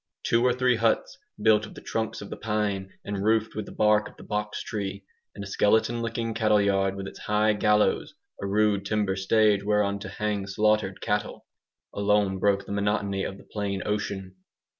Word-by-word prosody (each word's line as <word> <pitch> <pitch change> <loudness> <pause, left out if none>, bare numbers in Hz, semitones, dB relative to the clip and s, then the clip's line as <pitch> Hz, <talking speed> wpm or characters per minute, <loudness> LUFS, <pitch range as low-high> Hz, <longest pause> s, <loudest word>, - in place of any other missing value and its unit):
Two 115 +1 +2
or 125 - +4
three 125 -1 +2
huts 115 0 0 0.2
built 110 0 +4
of - - -14
the - - -10
trunks 110 0 -3
of 100 - -11
the - - -3
pine 105 -3 -2
and 100 -1 -3
roofed 110 +1 +2
with 110 -1 -5
the - - -9
bark 105 0 +2
of - - -20
the - - -12
box 105 0 -3
tree, 100 -2 -4 0.3
and 100 - -6
a - - -7
skeleton 110 +4 +2
looking 115 0 -2
cattle 110 -2 +3
yard 95 -1 +1
with 100 0 -5
its - - -10
high 105 +1 +2
"gallows" 105 0 +2 0.3
(a 100 - -2
rude 105 0 +2
timber 100 -2 0
stage 100 +1 +3
whereon 100 -1 +1
to 100 - -7
hang 105 -2 -2
slaughtered 105 -1 +1
cattle) 105 0 -2 0.5
alone 100 -2 +1
broke 100 0 +2
the - - -8
monotony 100 -1 0
of 100 - -4
the - - -15
plain 100 -2 -3
ocean. 100 -3 -3
105 Hz, 190 wpm, -26 LUFS, 100-110 Hz, 0.5 s, or